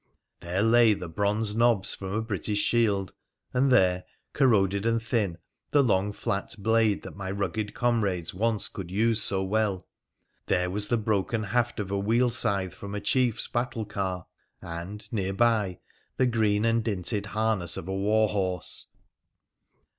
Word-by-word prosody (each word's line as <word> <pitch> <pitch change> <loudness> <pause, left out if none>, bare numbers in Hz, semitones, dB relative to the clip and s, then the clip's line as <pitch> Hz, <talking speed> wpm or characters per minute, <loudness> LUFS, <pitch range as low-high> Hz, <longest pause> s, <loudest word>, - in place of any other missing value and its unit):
There 90 +3 -1
lay 115 -1 +5
the 90 -3 -6
bronze 105 +5 0
nobs 115 -3 +2
from 95 -1 -6
a 110 +1 -1
British 105 -1 -2
shield, 100 -3 +1 0.4
and 130 +1 +2
there, 90 -6 +4 0.3
corroded 100 -7 +3
and 115 0 +2
thin, 110 -6 -1 0.3
the 145 -1 +4
long 100 -4 +1
flat 100 -1 -3
blade 110 0 +2
that - - -9
my 100 -1 -5
rugged 100 +2 -3
comrades 105 -7 0
once 110 +2 0
could 95 -4 -7
use 110 +3 +2
so 95 -1 +1
well. 100 -2 0 0.6
There 90 0 +1
was 105 +2 -1
the 120 - +1
broken 110 0 0
haft 120 +3 0
of 100 -2 -4
a 100 - 0
wheel 115 +5 +2
scythe 100 -6 0
from 100 0 -7
a - - -2
chief's 125 +1 +1
battle 120 -2 -2
car, 95 -3 -3 0.3
and, 85 +5 -7
near 95 -3 -1
by, 105 -5 +2 0.4
the 130 - +3
green 110 -3 +1
and 115 0 +2
dinted 100 0 -2
harness 105 -5 +1
of 80 - -6
a 95 - -3
war 105 +3 +2
horse. 95 -4 -1
105 Hz, 160 wpm, -27 LUFS, 95-115 Hz, 0.6 s, lay